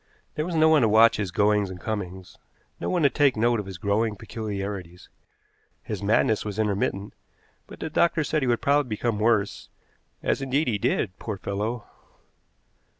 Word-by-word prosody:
There 155 +2 -2
was 175 - -3
no 160 0 +5
one 160 -2 +5
to 110 - +3
watch 110 +2 +6
his 100 -3 -2
goings 105 +1 +2
and 90 -1 -8
comings, 95 -3 -6 0.4
no - - -3
one 175 -3 +1
to 140 - +6
take 140 -3 +3
note 120 +1 +2
of 100 - -6
his 95 -2 -7
growing 105 +3 0
peculiarities. 100 -4 -6 0.7
His - - -5
madness 105 +1 +2
was 105 -1 -5
intermittent, 100 -1 -1 0.5
but - - -12
the 160 - -3
doctors 160 -1 +2
said 155 - 0
he 130 - 0
would 120 -1 0
probably 140 -2 +2
become 110 0 -1
worse, 110 -2 +1 0.5
as, - - 0
indeed, 135 +3 0
he 105 -4 0
did, 95 -1 -1
poor 105 -3 -5
fellow! 105 +5 -3
110 Hz, 175 wpm, -25 LUFS, 100-125 Hz, 0.7 s, watch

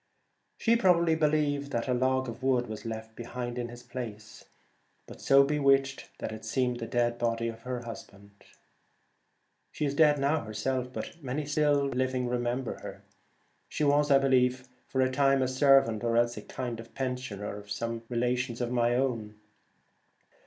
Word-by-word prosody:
She 230 0 +3
probably 170 -6 +4
believed 150 -2 +1
that 115 +2 -1
a 125 - +1
log 130 +1 +1
120 - - -3
of 125 - -21
wood 130 -2 +1
was 110 +1 -7
left 110 0 -6
behind 120 +1 -5
in 120 -1 -3
his 120 0 -11
place, 110 -4 -8 0.6
but - - -11
Kidnappers. - - -11
so 135 0 +7
bewitched 140 -1 +2
that - - -5
it 110 0 -8
seemed 125 -2 -1
the 115 - -4
dead 120 -1 0
body 115 0 0
of 115 0 -6
her 125 0 -4
husband. 100 -3 -10 1.4
She 150 - -2
is 140 - -1
dead 150 0 +5
now 145 +2 +1
herself, 125 +4 -2
but 165 - -7
many 140 +3 -3
still 145 -1 +2
living 130 -1 -1
remember 120 +1 -2
her. - - -9 0.7
She - - -2
was, 145 0 +3
I 140 - +7
believe, 130 -1 +2 0.2
for 130 - 0
a 130 0 +2
time 135 0 +3
a - - +1
servant 130 -4 +4
or 115 -1 +1
else 120 0 +2
a - - -6
kind 120 -3 -5
of 115 0 -12
pensioner 125 -7 -4
of 105 0 -12
some 115 +3 -3
relations 125 0 -1
of 120 -1 -2
my 120 -1 +2
own. 115 -5 -1
125 Hz, 175 wpm, -29 LUFS, 120-135 Hz, 1.4 s, so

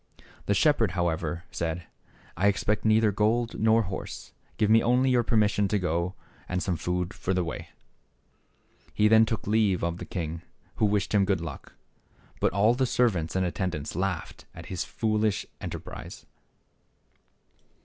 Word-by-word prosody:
The 100 - +2
shep 145 +8 +4
herd, 110 -6 +2
however, 85 -2 -1
said, 85 +1 -3 0.3
" - - -28
I 95 +5 +2
expect 105 +1 +1
neither 110 0 +4
gold, 115 +3 0
nor 110 +1 +4
horse; 95 -1 -7 0.2
give 110 - +2
me 110 +2 +6
only 125 +2 +3
your 125 -1 +4
permission 105 -3 +2
to 105 - +1
go 90 0 -1 0.3
and 90 0 -1
some 90 - 0
food 90 +2 -2
for 95 - -2
the 90 - +1
way! 85 - -6 0.6
" - - -35
He 105 - +4
then 110 +1 +6
took 110 -1 -3
leave 105 -4 +2
of 85 0 -1
the - - -6
king, 85 -2 -4 0.4
who 105 - +3
wished 105 0 0
him 100 -2 +4
good 95 -2 +1
luck. 85 -1 -8 0.7
But - - +2
all 105 +4 +4
the 130 +1 +1
servants 95 -11 +1
and 95 0 +2
attendants 85 -5 -3
laughed 90 -1 -3
at - - -9
his 90 - -1
foolish 110 -2 0 0.2
enterprise. - - -7
100 Hz, 165 wpm, -27 LUFS, 90-110 Hz, 0.7 s, me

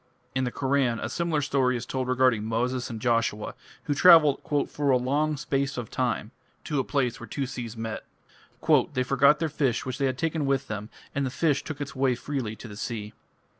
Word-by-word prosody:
In 130 0 0
the 125 - -2
Koran 130 -3 +1
a 110 - -3
similar 160 0 0
story 130 -3 +1
is 115 - -6
told 130 -1 -3
regarding 130 -4 +3
Moses 125 +3 -1
and 115 -2 -5
Joshua, 115 -2 0 0.3
who 145 - 0
travelled 155 -2 +7 0.3
"for 145 -1 -2
a 130 - +5
long 145 +4 0
space 140 -2 -1
of 120 -3 -5
time" 120 -3 -1 0.3
to 150 -3 -1
a - - +1
place 125 -4 -1
where - - -9
two 140 - -3
seas 120 -3 -6
met. 110 -1 -4 0.9
"They 130 -2 +1
forgot 135 +3 +4
their 160 - -1
fish 140 -5 0
which 130 +1 -4
they 135 - +2
had 130 -1 -2
taken 160 -1 -1
with 135 0 0
them, 105 0 -5 0.2
and 140 - 0
the 130 - 0
fish 145 +2 +1
took 150 -3 -6
its 145 -1 -5
way 130 -1 +2
freely 125 -4 -4
to 115 - -10
the 105 -1 -10
sea." 110 -2 -5
130 Hz, 205 wpm, -27 LUFS, 120-140 Hz, 0.9 s, travelled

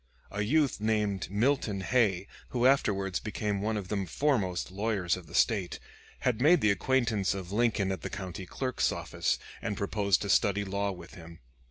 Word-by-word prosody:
A 105 - -2
youth 140 +2 +1
named 105 -4 0
Milton 105 -1 +1
Hay, 100 -4 +2 0.2
who 125 -1 0
afterwards 100 -8 +2
became 105 -2 -2
one 110 +1 -1
of 95 -3 -5
the 100 -2 -1
foremost 100 - 0
lawyers 100 -3 0
of 90 -3 -10
the 85 - -9
State, 100 -6 +1 0.4
had 125 -2 0
made 160 +3 +5
the 105 - +4
acquaintance 110 -2 +1
of 95 -1 -6
Lincoln 105 -3 +1
at 95 -4 -4
the - - -4
County 95 -1 -6
Clerk's 130 +4 -1
office - - -1 0.2
and 105 -3 -3
proposed 100 -1 +1
to 100 - -4
study 100 0 +2
law 100 +1 -1
with 90 -2 -10
him. 85 -1 -11
100 Hz, 175 wpm, -30 LUFS, 95-115 Hz, 0.4 s, made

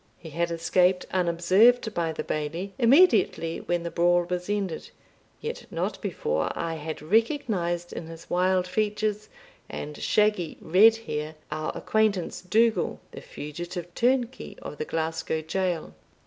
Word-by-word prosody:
He 160 - -11
had 170 +3 -1
escaped 180 +2 +2
unobserved 190 +7 +3
by 170 -3 -1
the 160 - -4
Bailie, 165 +6 -3
immediately 265 - +4
when 175 -1 -1
the 170 - -4
brawl 175 0 +3
was 180 +1 -3
ended, 200 -5 -2 0.5
yet - - -5
not - - -3
before 75 +1 -1
I 165 -1 -2
had 155 -1 -6
recognised, 185 - 0
in 160 - -6
his 165 0 -11
wild 185 +1 +2
features 210 +2 -1 0.4
and 150 0 -6
shaggy 210 -5 +1
red 205 +7 +6
hair, 155 -9 -5 0.2
our 155 0 -2
acquaintance 215 -5 0
Dougal, 220 +5 +2
the - - -9
fugitive 175 +4 -7
turnkey 250 +2 0
of 150 - -8
the - - -2
Glasgow 160 0 -2
jail. 175 +1 -2
175 Hz, 135 wpm, -26 LUFS, 165-210 Hz, 0.5 s, red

